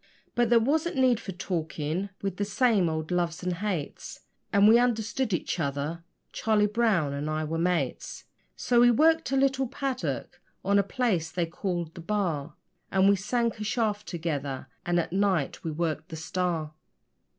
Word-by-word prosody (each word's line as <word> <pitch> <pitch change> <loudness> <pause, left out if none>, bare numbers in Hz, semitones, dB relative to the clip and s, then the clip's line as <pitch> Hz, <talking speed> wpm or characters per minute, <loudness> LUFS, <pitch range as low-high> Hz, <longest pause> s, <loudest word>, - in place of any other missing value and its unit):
But 240 -1 +2
there 240 -1 +6
wasn't 305 +8 +1
need 255 -3 +3
for 195 - -6
talking 170 0 -3
we'd 195 -2 -2
the 205 - 0
same 210 -4 +2
old 160 +1 -3
loves 175 -1 -1
and 180 0 0
hates, 185 -7 -4 0.3
And 200 -1 +5
we 230 +2 +7
understood 240 0 0
each 175 0 -1
other 145 +3 -2 0.3
Charlie 215 -2 +2
Brown 210 -9 +1
and 145 +2 -3
I 155 0 -1
were 160 +1 -2
mates. 170 -7 -1 0.3
So 240 -1 +2
we 245 - +7
worked 320 +5 +3
a 270 - +2
little 270 -1 +2
'paddock' 265 +1 -3 0.2
on 200 +1 +4
a - - +3
place 195 -7 0
they 175 -1 0
called 170 -1 -3
the 170 - -9
'Bar', 165 -6 -2 0.4
And 190 0 +4
we 200 - +5
sank 230 +3 -1
a - - -3
shaft 210 -1 -1
together, 145 -6 -3 0.2
and 175 0 +2
at 170 - -3
night 190 -7 0
we 165 - -2
worked 160 +1 -2
the 160 - -6
STAR. 165 -2 -2
190 Hz, 175 wpm, -27 LUFS, 165-225 Hz, 0.4 s, we